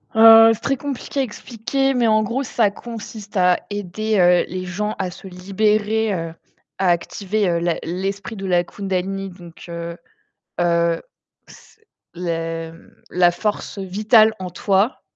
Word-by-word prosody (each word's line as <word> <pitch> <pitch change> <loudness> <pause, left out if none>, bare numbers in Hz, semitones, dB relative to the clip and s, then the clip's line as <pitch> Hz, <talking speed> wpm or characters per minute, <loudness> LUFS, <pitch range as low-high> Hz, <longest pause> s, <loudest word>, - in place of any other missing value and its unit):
Heu, 225 0 +9
c'est 220 - -7
très 275 - 0
compliqué 275 0 -3
à - - +2
expliquer, 260 +3 -2
mais 245 -2 +2
en 215 0 +3
gros, 240 +6 -2
ça 225 -4 +1
consiste 215 -2 -8
à 180 -1 +4
aider, 205 +2 -2
heu, 180 0 +5
les 185 0 -4
gens 210 +4 -3
à 190 -1 -1
se 190 - -11
libérer, 210 +3 0
heu, 165 -2 -4 0.5
à 190 -1 +2
activer, 195 +4 0
heu, 170 -1 +1
la 170 -1 0
l'esprit 195 +6 -4
de 195 -1 -6
la 175 -2 +2
kundalini, 195 +1 -3
donc 175 -2 -13
heu 170 0 -5 0.7
heu, 170 -1 +1 0.5
c 440 - -18 0.3
les 165 -1 -3
m 165 - -18 0.2
la 175 -1 +4
force 205 +3 -3
vitale 215 +4 +4
en 185 -1 -6
toi, 195 +6 0
195 Hz, 155 wpm, -21 LUFS, 175-220 Hz, 0.7 s, Heu